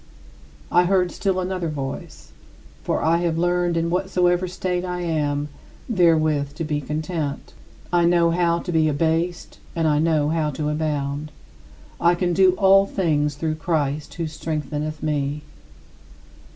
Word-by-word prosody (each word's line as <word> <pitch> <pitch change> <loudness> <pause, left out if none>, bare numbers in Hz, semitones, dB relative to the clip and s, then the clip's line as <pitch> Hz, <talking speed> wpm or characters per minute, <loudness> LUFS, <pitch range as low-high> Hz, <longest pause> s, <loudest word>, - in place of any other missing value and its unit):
I 175 0 +5
heard 180 -1 +2
still 190 -2 -1
another 180 -1 -2
voice: 135 -3 -6 0.5
"For - - -1
I 165 +1 +3
have 170 -2 0
learned, 175 0 +1
in 165 0 0
whatsoever 180 0 +1
state 180 0 -2
I 180 -1 -3
am, 150 -3 -1 0.4
therewith 155 - +2
to 165 - -4
be 150 -1 -2
content. 150 0 -4 0.4
I 175 -1 +4
know 170 -1 +4
how 170 0 +2
to 175 - -4
be 160 -2 +3
abased 165 +4 -1 0.2
and 165 -1 +1
I 150 -1 +2
know 155 -2 +2
how 155 -1 0
to 150 +1 -3
abound.... 150 -1 -2 0.7
I 170 +1 +4
can 175 0 0
do 185 0 +5
all 195 +1 +5
things 150 -7 0
through 155 +1 -2
Christ 150 -3 -1
who 170 - -2
strengtheneth 155 -1 -4
me." 150 -1 -1
165 Hz, 145 wpm, -22 LUFS, 150-175 Hz, 0.7 s, I